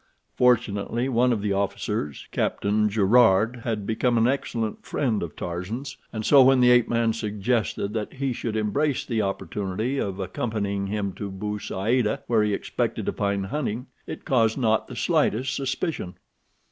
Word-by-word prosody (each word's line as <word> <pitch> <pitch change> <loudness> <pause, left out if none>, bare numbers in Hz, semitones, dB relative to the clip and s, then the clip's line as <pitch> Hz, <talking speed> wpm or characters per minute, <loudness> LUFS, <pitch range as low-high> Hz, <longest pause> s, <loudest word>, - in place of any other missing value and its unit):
Fortunately 120 -1 +2
one 125 -1 +3
of 110 -4 -1
the 100 -1 +1
officers, 95 -7 -2
Captain 105 +1 +1
Gerard, 110 +2 +4
had 115 -3 -3
become 120 +2 +1
an 115 +1 +4
excellent 115 -5 -2
friend 120 -7 -1
of 85 -3 -5
Tarzan's, 110 +11 -5 0.2
and 110 -1 -4
so 140 -2 +7
when 130 0 +6
the 125 0 +6
ape 125 -1 +4
man 115 -1 +2
suggested 105 -1 -1
that 110 -2 -3
he 135 -1 -2
should 115 -2 -4
embrace 130 +7 0
the 115 -3 0
opportunity 100 +6 -2
of 100 -1 -3
accompanying 100 0 -2
him 100 -1 -2
to 100 - -4
Bou 105 +2 -4
Saada, 105 +4 0
where 115 -2 +2
he 105 0 +1
expected - - -2
to - - -1
find 100 -1 -1
hunting, 125 +1 -3 0.2
it - - -7
caused 115 -4 +2
not 110 -4 +1
the - - -8
slightest 130 +5 +1
suspicion. 135 - -3
110 Hz, 160 wpm, -25 LUFS, 100-125 Hz, 0.2 s, so